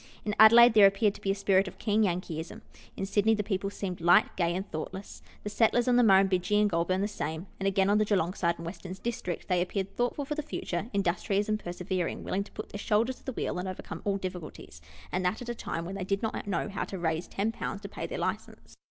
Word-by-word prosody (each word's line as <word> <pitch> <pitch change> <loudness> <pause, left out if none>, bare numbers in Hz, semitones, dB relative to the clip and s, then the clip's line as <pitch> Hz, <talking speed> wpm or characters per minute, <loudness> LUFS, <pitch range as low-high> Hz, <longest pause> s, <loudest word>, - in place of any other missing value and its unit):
In 210 - -1
Adelaide, 230 +2 +9
there 210 -2 +8
appeared 200 +1 +2
to - - -13
be 195 - -2
a 195 - +2
spirit 195 -1 +2
of - - -9
keen 215 0 +1
Yankeeism; 170 -4 -2 0.4
in - - -2
Sydney, 205 +3 +2
the 210 - -2
people 195 -1 -2
seemed 185 -3 -5
light, 175 +1 +4
gay, 170 -1 0
and 190 +2 -3
thoughtless; 185 +5 -6 0.2
the 210 - -3
settlers 235 +2 +2
on 250 - +4
the 245 - +6
Murrum 195 -4 +6
bidgee 190 +2 +1
and 210 - +4
Goulburn, 185 +1 0
the 205 - +1
same; 160 -4 -4
and 195 - -1
again, 195 0 +2
on 205 +1 +3
the - - +4
G 205 - +2
eelong 180 0 0
side 170 -1 +1
and 165 - -8
Western 180 +1 -7
District, 225 -7 -4
they 180 -1 +2
appeared 190 +2 -3
thoughtful 245 +4 -1
for 300 - -3
the 305 - -2
future 210 - -4
industrious 200 +1 0
and 215 0 0
persevering, 180 -1 -3
willing 195 +2 -1
to - - -17
put - - -7
their 205 - -7
shoulder 225 +5 +1
to - - -21
the 265 - -5
wheel 180 - -2
and 185 - -4
overcome 185 - -7
all 200 -1 0
difficulties, 180 - -8 0.3
and 185 - -1
that 180 +4 0
at 240 - -8
a - - -1
time 165 -7 -5
when 185 - -6
they 195 -1 -4
did 195 +3 -2
not 220 -2 -3
know 200 - -1
how 200 - -3
to 195 - -6
raise 160 -1 -1
10 210 +3 -1
to 210 -3 -5
pay - - -6
their - - -5
license. - - -5
195 Hz, 250 wpm, -29 LUFS, 180-210 Hz, 0.4 s, Adelaide